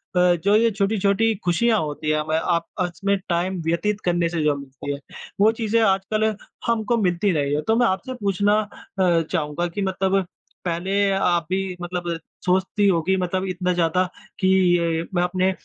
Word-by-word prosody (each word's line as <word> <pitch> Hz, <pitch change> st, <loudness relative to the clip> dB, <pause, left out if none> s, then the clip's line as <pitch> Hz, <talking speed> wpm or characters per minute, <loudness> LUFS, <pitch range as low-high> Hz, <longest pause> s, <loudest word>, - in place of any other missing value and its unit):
अ, 180 Hz, 0 st, +4 dB
जो 205 Hz, +1 st, +4 dB
ये 230 Hz, +1 st, +4 dB
छोटी-छोटी 200 Hz, +2 st, +1 dB
खुशियाँ 215 Hz, +5 st, +2 dB
होती 150 Hz, 0 st, -4 dB
हैं 155 Hz, 0 st, +2 dB
हमें 155 Hz, +1 st, -1 dB
आपस 170 Hz, +1 st, -2 dB
में 200 Hz, 0 st, +3 dB
टाइम 175 Hz, +2 st, 0 dB
व्यतीत 205 Hz, +5 st, 0 dB
करने 175 Hz, -1 st, +1 dB
से 165 Hz, -2 st, -2 dB
जो 150 Hz, -1 st, +2 dB
मिलती 140 Hz, +1 st, -7 dB
है, 140 Hz, -, -6 dB, 0.4 s
वो 220 Hz, +2 st, +6 dB
चीज़ें 230 Hz, 0 st, 0 dB
आजकल 195 Hz, +1 st, +1 dB, 0.4 s
हमको 230 Hz, 0 st, +1 dB
मिलती 185 Hz, +2 st, +1 dB
नहीं 145 Hz, -1 st, 0 dB
है। 150 Hz, -, 0 dB
तो 225 Hz, -, +3 dB
मैं 240 Hz, 0 st, +3 dB
आपसे 190 Hz, +7 st, -2 dB
पूछना 200 Hz, +1 st, +2 dB, 0.5 s
अ, 175 Hz, -3 st, +4 dB
चाहूँगा 165 Hz, 0 st, -1 dB
कि 185 Hz, +4 st, -5 dB
मतलब 190 Hz, 0 st, +1 dB, 0.4 s
पहले 190 Hz, +4 st, 0 dB
आप 175 Hz, -4 st, +1 dB
भी 190 Hz, -1 st, -2 dB
मतलब 175 Hz, 0 st, -4 dB, 0.4 s
सोचती 190 Hz, +3 st, +2 dB
होगी 185 Hz, +1 st, +2 dB
मतलब 185 Hz, +1 st, -1 dB
इतना 180 Hz, 0 st, -1 dB
ज़्यादा 175 Hz, +1 st, +2 dB, 0.4 s
कि 185 Hz, -, +2 dB, 0.3 s
ये 165 Hz, -1 st, 0 dB
मैं 175 Hz, -, +3 dB
अपने 185 Hz, +1 st, +1 dB
185 Hz, 175 wpm, -23 LUFS, 170-200 Hz, 0.5 s, वो